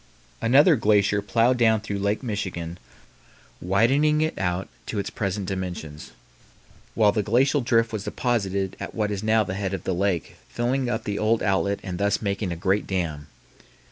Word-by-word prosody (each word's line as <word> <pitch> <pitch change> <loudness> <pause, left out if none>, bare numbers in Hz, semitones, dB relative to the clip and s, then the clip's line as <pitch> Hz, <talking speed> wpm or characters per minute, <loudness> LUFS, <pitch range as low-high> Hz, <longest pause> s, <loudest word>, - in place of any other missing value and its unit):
Another 145 +8 +5
glacier 105 -3 +2
plowed 115 +4 +2
down 110 -2 +4
through 100 -1 -4
Lake 100 +5 -1
Michigan, 90 -7 -4 0.8
widening 135 - +3
it 155 0 0
out 90 0 -1 0.2
to 110 - -4
its 100 - -2
present 100 -1 -2
dimensions, 90 -5 -5 0.8
while 105 -2 +4
the 105 - 0
glacial 130 +7 +2
drift 115 -2 +1
was 105 -2 -4
deposited 100 -6 -1
at - - -7
what 105 -1 -1
is 100 -1 -3
now 110 0 +3
the 95 - -5
head 100 0 -2
of 90 - -7
the 95 - -1
lake, 90 -2 -1
filling 125 +2 -1
up 110 -1 -2
the 100 -1 -3
old 110 +1 +1
outlet 100 0 +1
and 90 -2 -5
thus 100 0 +1
making 100 -2 -2
a - - -2
great 95 +4 0
dam. 80 -6 -3
100 Hz, 170 wpm, -24 LUFS, 95-115 Hz, 0.8 s, Another